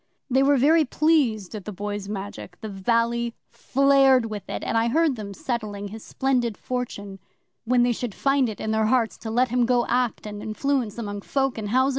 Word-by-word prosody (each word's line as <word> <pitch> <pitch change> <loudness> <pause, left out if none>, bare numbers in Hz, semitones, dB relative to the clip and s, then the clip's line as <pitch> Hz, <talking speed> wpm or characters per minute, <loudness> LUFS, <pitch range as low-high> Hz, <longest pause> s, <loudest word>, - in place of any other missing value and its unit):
They 265 +2 +4
were 280 +1 +4
very 310 +5 +5
pleased 265 - +1
at 210 -3 -7
the 210 - -5
Boy's 205 0 -5
Magic 195 -3 -7
the 220 - -5
valley 230 +4 0 0.2
flared 270 -2 +4
with 210 -3 -6
it - - -4
and - - -2
I 225 +1 +3
heard 310 +2 +2
them 210 -3 -7
settling 210 -5 -4
his 220 +2 -9
splendid 245 -5 0
fortune 205 -6 -5 0.5
when 245 +1 +3
they 245 - +3
should 235 -3 -5
find 275 -3 +2
it 215 - -7
in 220 - -2
their 220 0 +2
hearts 235 -1 +2
to 220 - -6
let 245 +3 +2
him 245 +1 +2
go 245 -1 +2
to - - -6
act 250 -3 0
and 210 -1 -6
influence 225 +1 -1
among 205 -3 -4
folk 270 +1 -1
in 210 - -4
housen. 260 +5 +3
235 Hz, 205 wpm, -24 LUFS, 210-260 Hz, 0.5 s, very